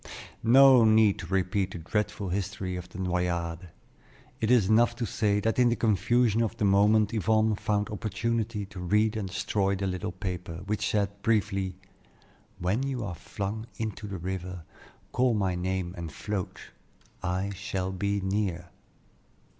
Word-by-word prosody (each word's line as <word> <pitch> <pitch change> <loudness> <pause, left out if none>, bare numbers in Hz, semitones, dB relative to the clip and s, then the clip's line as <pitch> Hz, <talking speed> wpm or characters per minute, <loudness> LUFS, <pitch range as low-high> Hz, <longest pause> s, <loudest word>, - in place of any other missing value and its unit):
No 130 +1 +7
need 110 -2 +5
to 80 - -6
repeat 95 +1 0
the 90 - -7
dreadful 100 +3 -2
history 95 0 -3
of 90 0 -7
the - - -11
Noyades; 90 -2 -2 0.7
it 110 - 0
is 120 -6 +5
enough 120 +2 +4
to 115 - -2
say 105 0 +1
that 115 +4 0
in 125 -1 +5
the 120 - +1
confusion 110 +2 +2
of 115 0 -1
the 110 - +1
moment 105 +2 +4
Yvonne 110 0 +2
found 105 0 -1
opportunity 110 0 -2
to 100 -1 -10
read 105 +5 +2
and 100 -3 -3
destroy 100 +2 0
the 95 +1 -3
little 90 -2 -2
paper, 90 -2 -5
which 105 +1 -1
said 100 -1 -1
briefly: 100 -4 0 0.8
"When 95 +8 0
you 135 -3 -2
are 95 - -4
flung 105 +5 -5
into 110 -1 -4
the 95 -2 -5
river, 90 0 -5 0.5
call 125 -2 +2
my 95 -3 +1
name 90 0 -2
and 85 -2 -6
float. 100 +5 -4 0.6
I 95 +3 -1
shall 95 -1 -3
be 100 +2 -1
near." 95 -3 -2
100 Hz, 155 wpm, -28 LUFS, 90-110 Hz, 0.8 s, No